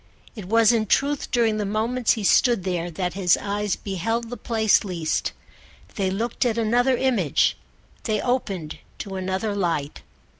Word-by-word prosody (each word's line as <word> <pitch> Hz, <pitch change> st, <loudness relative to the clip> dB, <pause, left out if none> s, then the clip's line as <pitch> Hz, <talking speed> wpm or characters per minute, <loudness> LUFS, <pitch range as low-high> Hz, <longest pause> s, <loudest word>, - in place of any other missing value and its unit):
It 210 Hz, -5 st, -7 dB
was 225 Hz, +3 st, +4 dB
in 220 Hz, -2 st, +1 dB
truth 280 Hz, +6 st, +1 dB
during 230 Hz, -3 st, +2 dB
the 210 Hz, -, -1 dB
moments 220 Hz, +4 st, +1 dB
he 220 Hz, -, -4 dB
stood 235 Hz, 0 st, +3 dB
there 175 Hz, -2 st, -2 dB
that 180 Hz, +1 st, -3 dB
his 185 Hz, -2 st, +3 dB
eyes 205 Hz, 0 st, -2 dB
beheld 225 Hz, +5 st, -3 dB
the -, -, -3 dB
place 220 Hz, -3 st, +2 dB
least. 170 Hz, -5 st, -2 dB, 0.6 s
They 195 Hz, -2 st, -1 dB
looked 225 Hz, +7 st, -2 dB
at 235 Hz, -2 st, 0 dB
another 245 Hz, +3 st, +2 dB
image, 235 Hz, -, +2 dB, 0.5 s
they 215 Hz, -2 st, 0 dB
opened 200 Hz, -11 st, -2 dB, 0.2 s
to 195 Hz, -2 st, -6 dB
another 190 Hz, +3 st, -2 dB
light. 165 Hz, -, -2 dB
215 Hz, 155 wpm, -23 LUFS, 190-235 Hz, 0.6 s, was